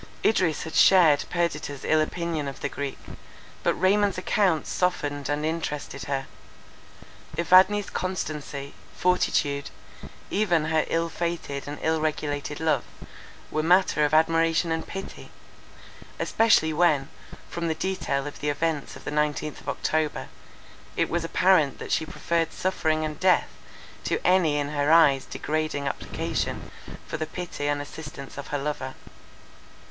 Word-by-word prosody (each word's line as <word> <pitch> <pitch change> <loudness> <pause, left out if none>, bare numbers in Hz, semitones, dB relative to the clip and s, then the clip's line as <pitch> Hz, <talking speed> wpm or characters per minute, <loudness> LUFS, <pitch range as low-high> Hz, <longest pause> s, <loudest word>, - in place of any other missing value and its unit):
Idris 180 -8 +2
had 160 - -7
shared 170 -6 +6
Perdita's 170 -5 -2
ill 155 0 +3
opinion 165 -2 -2
of 135 - -7
the - - -1
Greek; 140 -1 -4 0.6
but - - +1
Raymond's 200 +2 +2
account 185 -3 +1
softened 145 -6 -1
and 145 +1 0
interested 150 -3 -3
her. 135 -1 -2 1.1
Evadne's 185 +4 +5
constancy, 150 -6 -4 0.2
fortitude, 145 -5 +1 0.6
even 175 -7 +2
her 160 0 +1
ill 165 0 0
fated 165 -5 -4
and 145 +1 -5
ill 160 0 +1
regulated 150 -2 -2
love, 155 -6 +1 0.7
were 155 - 0
matter 175 -2 +4
of 150 - +2
admiration 165 +1 +3
and 160 0 -2
pity; 195 0 -7 0.9
especially 220 -8 +3
when, 150 -4 +3 0.4
from 170 0 -3
the 160 - 0
detail 160 -6 -2
of 145 - -7
the 150 - -1
events 155 0 -1
of - - -12
the - - -4
nineteenth 150 0 -1
of - - -6
October, 155 -1 -1 0.7
it - - +1
was 170 0 0
apparent 165 -4 +3
that - - -7
she 160 - +1
preferred 165 +1 -1
suffering 155 -4 0
and 155 -1 -5
death 185 -1 +3 0.5
to - - 0
any 175 -5 +4
in 145 -1 -1
her 145 0 +1
eyes 145 -5 +6
degrading 155 -2 -2
application - - -3 0.3
for - - -4
the 155 - -3
pity 175 -5 -5
and 145 0 0
assistance 145 -2 -9
of 140 - -7
her 145 - -2
lover. 140 -2 -4
155 Hz, 140 wpm, -26 LUFS, 145-170 Hz, 1.1 s, shared